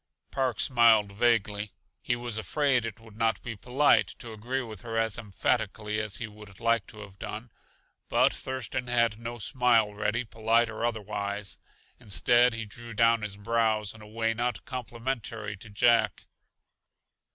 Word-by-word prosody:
Park 130 -3 -1
smiled 115 -5 +5
vaguely. 105 -2 +1 0.3
He 120 - 0
was 120 -2 -3
afraid 125 -1 +1
it 110 0 -8
would 110 -2 -15
not 115 0 +1
be 115 -2 -5
polite 125 +8 +3
to 115 -2 -8
agree 125 +5 -3
with 110 -5 -9
her 115 -1 -4
as 115 -2 +2
emphatically 105 0 -1
as 110 -2 -3
he 115 - -4
would 105 -2 -13
like 115 -4 +2
to 105 - -10
have 100 -2 -12
done. 110 +3 -6 0.6
But - - +4
Thurston 130 -1 -3
had 115 -3 +2
no 115 +1 -5
smile 115 -3 +2
ready, 105 +3 -1
polite 115 +2 +2
or 110 - -5
otherwise. 105 -3 -3 0.4
Instead 120 +3 +3
he 115 -1 -4
drew 115 +2 -7
down 115 +1 +4
his 105 -2 -4
brows 110 -1 +1
in 110 - -14
a 105 - -12
way 115 +1 0
not 120 +2 -2
complimentary 120 -4 -4
to 110 +3 -12
Jack. 115 +1 +3
115 Hz, 160 wpm, -28 LUFS, 105-120 Hz, 0.6 s, smiled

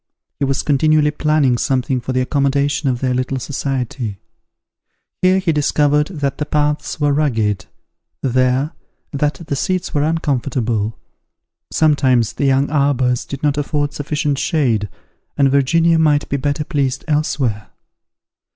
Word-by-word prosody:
He 140 - +1
was 135 0 -1
continually 150 +1 +3
planning 150 -5 +1
something 130 -1 0
for 130 - -4
the 130 0 +1
accommodation 140 +1 +1
of 125 -2 -2
their 130 -1 +1
little 130 +1 -1
society. 130 -5 -3 1.0
Here 185 +1 +4
he 185 -3 +1
discovered 150 0 +2
that 145 -7 -3
the 150 - -1
paths 150 +1 -1
were 145 -1 +2
rugged; 115 -9 0 0.6
there, 130 +3 +1 0.4
that 145 +1 0
the 140 - -2
seats 185 +6 -2
were 145 - +1
uncomfortable: 130 -8 -1 0.7
sometimes 130 -7 +2
the 140 - -1
young 135 +1 +2
arbours 135 -4 +1
did 140 +1 -7
not 145 -1 +1
afford 145 0 -1
sufficient 145 -1 -2
shade, 115 - 0 0.5
and 140 -2 +3
Virginia 165 +4 +3
might 150 -2 +2
be 140 - 0
better 145 +2 -1
pleased 140 -5 -2
elsewhere. 135 -8 -1
140 Hz, 135 wpm, -18 LUFS, 130-150 Hz, 1.0 s, Here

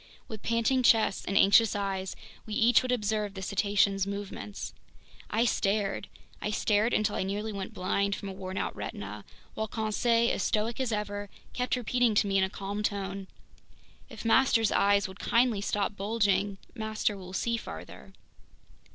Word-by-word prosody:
With 220 -2 -8
panting 230 +3 +1
chests 225 -4 +4
and 195 - 0
anxious 205 +2 +6
eyes, 195 -2 -2 0.3
we 215 - -4
each 240 0 +5
would 255 - -2
observe 210 -3 -1
the 190 - -6
cetacean's 200 0 +2
movements. 200 0 -6 0.6
I 225 +3 +2
stared; 200 -2 0 0.3
I - - -1
stared 210 +2 +2
until 215 -2 +1
I - - -1
nearly 205 +3 -3
went 195 -1 -6
blind 200 +2 0
from 200 - -7
a 195 - -5
worn 190 0 -6
out - - -2
retina, 100 +1 -6 0.3
while 220 - -2
Conseil, 230 +2 +1
as - - -1
stoic 220 +5 0
as 255 -3 0
ever, 205 -1 -3 0.2
kept 250 +1 0
repeating 245 -2 +1
to 205 - +4
me 195 -1 +2
in - - +3
a 190 - 0
calm 200 +1 -4
tone: 195 -2 -3 0.8
"If - - -9
master's 225 -2 +4
eyes 200 0 +3
would 190 +2 -12
kindly 235 -3 +2
stop 205 0 -1
bulging, 200 -1 +1 0.2
master 220 -2 -1
will 185 -2 -9
see 235 +4 0
farther!" 230 - -8
205 Hz, 165 wpm, -29 LUFS, 195-225 Hz, 0.8 s, anxious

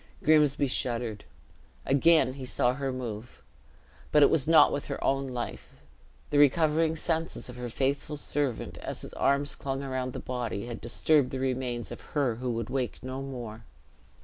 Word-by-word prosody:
Grimsby 150 -2 +4
shuddered. 120 -4 -2 0.6
Again 140 -1 +4
he 135 -1 -8
saw 125 -1 +1
her 135 0 -2
move; 120 -3 -6 0.7
but 150 - +6
it - - +6
was 150 -3 +2
not 165 0 +7
with 145 - -3
her - - -4
own 135 0 +1
life; 125 -2 -7 0.5
the 145 - +3
recovering 155 +2 +4
senses 160 -3 -2
of 125 - -8
her 125 -1 -5
faithful 140 +4 -1
servant, 140 -4 -2
as - - -5
his - - -9
arms 140 +1 +1
clung 135 0 -4
around 130 -2 -3
the - - -5
body, 120 -4 -3
had 120 -1 -7
disturbed 140 +4 +2
the 130 - -4
remains 125 -2 -2
of - - -7 0.2
her 130 -6 +1
who 125 +1 -3
would 115 0 -3
wake 130 -2 -2
no 130 +1 -5
more. 120 -5 -7
130 Hz, 170 wpm, -28 LUFS, 125-145 Hz, 0.7 s, not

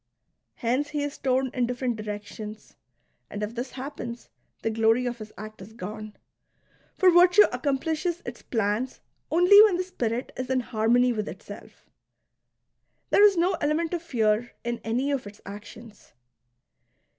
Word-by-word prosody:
Hence 260 +4 0
he 295 -1 -2
is 290 -1 -5
torn 260 -1 +1
in 245 -2 0
different 245 0 -2
directions; 210 0 -7 0.5
and 210 - -5
if 210 +2 -4
this 245 +2 -5
happens, 255 -3 -7 0.3
the 225 - 0
glory 225 +3 +2
of 240 -1 -3
his 215 0 -9
act 215 0 -9
is 200 +4 -11
gone. 215 0 -7 0.8
For 375 -1 +6
virtue 360 +4 +7
accomplishes 320 +4 -1
its 240 0 -7
plans 225 +3 -1 0.3
only 360 +5 +7
when 420 -5 +5
the 365 - 0
spirit 245 -9 -3
is 255 0 -5
in 260 -1 +2
harmony 240 +2 +2
with 215 -1 -3
itself. - - -11 1.3
There 410 - +6
is 405 -3 +6
no 355 +3 +3
element 310 +3 0
of 345 - -1
fear 235 -6 0
in 235 0 -3
any 250 +5 0
of 265 -6 -2
its 205 +1 -12
actions. 210 +2 -11
245 Hz, 150 wpm, -26 LUFS, 220-295 Hz, 1.3 s, virtue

